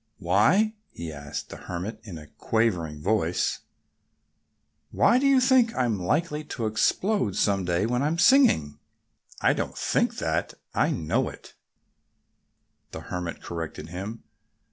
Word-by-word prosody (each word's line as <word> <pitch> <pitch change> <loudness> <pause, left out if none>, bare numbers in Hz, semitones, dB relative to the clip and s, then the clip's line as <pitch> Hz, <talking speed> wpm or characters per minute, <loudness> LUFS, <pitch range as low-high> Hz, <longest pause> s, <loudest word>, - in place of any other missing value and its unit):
"Why" 110 - +3 0.2
he 85 -2 -7
asked 70 -1 -6
the - - -7
Hermit 95 +5 -6
in 100 -7 -9
a 75 - -10
quavering 85 -7 -1
voice 95 -4 0 1.3
"why 240 +3 +4
do 275 - +2
you 275 -1 +5
think 255 -3 +3
I'm 120 -6 0
likely 150 - -1
to 125 -6 -5
explode 110 - +1
some 100 -3 +1
day 85 +3 +1
when 125 +2 0
I'm 155 +4 0
singing?" 175 - +4 0.6
"I - - +4
don't - - -4
think - - 0
that. - - -2 0.2
I - - +2
know 80 - 0
it," - - -14 1.4
the - - -8
Hermit 90 -2 -4
corrected 85 -1 -6
him. 100 +6 -6
110 Hz, 135 wpm, -26 LUFS, -, 1.4 s, you